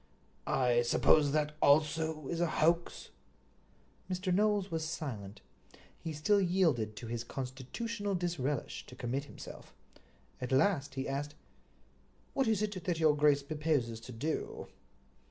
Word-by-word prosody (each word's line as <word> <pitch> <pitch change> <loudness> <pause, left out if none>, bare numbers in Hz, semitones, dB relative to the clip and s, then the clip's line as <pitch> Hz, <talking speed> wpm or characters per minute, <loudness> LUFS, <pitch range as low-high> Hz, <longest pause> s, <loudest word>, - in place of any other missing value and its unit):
"I 120 -2 +3
suppose 145 +4 +4
that 150 0 0
also 155 0 +3
is 170 0 -2
a 175 - +3
hoax?" 170 +2 +1 1.0
Mr. 185 0 -1
Knowles 205 0 +2
was 160 -1 -1
silent. 120 -11 -5 0.6
He 165 - -5
still 180 +7 +2
yielded 165 - +2
to 120 - -8
his 115 0 -3
constitutional 195 - -4
disrelish 150 -7 -2
to 125 - -11
commit 130 +3 -2
himself. - - -11 0.7
At 125 - -4
last 140 -2 +2
he 135 0 -2
asked: 145 +2 -3 1.0
"What 270 -3 +1
is 215 -2 +2
it 200 -4 -3
that 170 -2 -1
your 155 -2 +5
grace 145 -1 +4
proposes 145 -6 -1
to 115 - -10
do?" 145 +7 -3
150 Hz, 135 wpm, -33 LUFS, 130-175 Hz, 1.0 s, your